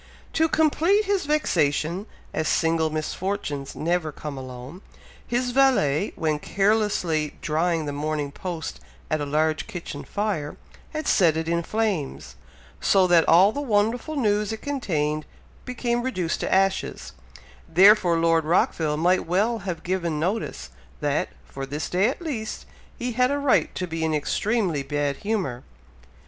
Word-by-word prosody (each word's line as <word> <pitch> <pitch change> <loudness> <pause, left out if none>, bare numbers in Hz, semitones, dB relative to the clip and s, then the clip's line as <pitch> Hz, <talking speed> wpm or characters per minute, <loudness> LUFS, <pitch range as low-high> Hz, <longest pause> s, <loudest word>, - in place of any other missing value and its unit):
To 320 0 +2
complete 330 +7 +3
his 390 -6 0
vexation, 180 - +1 0.3
as 155 - -1
"single 160 -1 +2
misfortunes 155 -2 -3
never 170 -1 0
come 150 0 -7
alone," 130 +6 -8 0.5
his 245 +1 0
valet, 240 - +3
when 155 -2 0
carelessly 195 -6 +1
drying 160 +1 0
the 145 - -3
Morning 150 0 -2
Post 170 0 -5 0.3
at 155 -1 +1
a 145 - -2
large 155 +2 0
kitchen 170 -5 -6
fire, 200 -8 -3 0.3
had 310 -1 -4
set 165 -5 +4
it 160 0 -2
in 170 0 +1
flames, 170 - -2 0.4
so 190 -1 +4
that 175 -2 +4
all 185 +5 +7
the 285 - -4
wonderful 235 +4 0
news 210 -5 +1
it 220 - -6
contained 155 - -1 0.4
became 240 -1 -1
reduced 185 -10 -2
to - - -2
ashes, 195 0 +1 0.6
therefore 190 -2 +6
Lord 165 0 +3
Rockville 155 -1 +1
might 180 +3 +2
well 210 +7 +1
have 180 -4 -5
given 170 -4 -1
notice, 170 - -2 0.3
that, - - 0 0.2
for 135 0 -7
this 145 +2 -3
day 185 +4 +3
at 275 +7 -3
least, 235 -9 -4 0.3
he 245 -1 -2
had 250 +2 +2
a 285 - 0
right 285 -2 +2
to 185 - -2
be 165 -2 -4
in 160 -1 +1
extremely 180 +1 0
bad 145 0 -1
humour. 195 - -2
175 Hz, 145 wpm, -24 LUFS, 155-220 Hz, 0.6 s, all